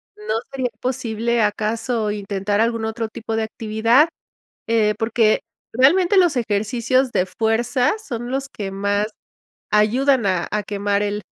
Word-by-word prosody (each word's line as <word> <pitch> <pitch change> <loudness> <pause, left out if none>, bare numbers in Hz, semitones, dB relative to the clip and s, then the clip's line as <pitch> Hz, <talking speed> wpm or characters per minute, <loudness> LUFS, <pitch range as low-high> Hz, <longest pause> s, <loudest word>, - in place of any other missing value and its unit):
¿no 210 +1 -3 0.2
sería 260 -2 -2
posible 235 -2 -1
acaso 220 +1 -1
intentar 205 0 -1
algún 230 -1 0
otro 225 0 -3
tipo 225 0 -5
de 225 - 0
actividad? 225 +6 +2 0.6
Eh, 220 -2 +2
porque 225 -1 +2 0.3
realmente 345 - +4
los 350 -5 +4
ejercicios 240 +4 0
de 180 - +1
fuerza 225 +6 +1
son 240 - -6
los 270 +1 -2
que 205 -7 -6
más 200 +2 0 0.6
ayudan 240 +4 +3
a 185 -3 0
a 210 0 -1
quemar 205 0 -1
el, 205 0 -2
225 Hz, 135 wpm, -21 LUFS, 210-245 Hz, 0.6 s, realmente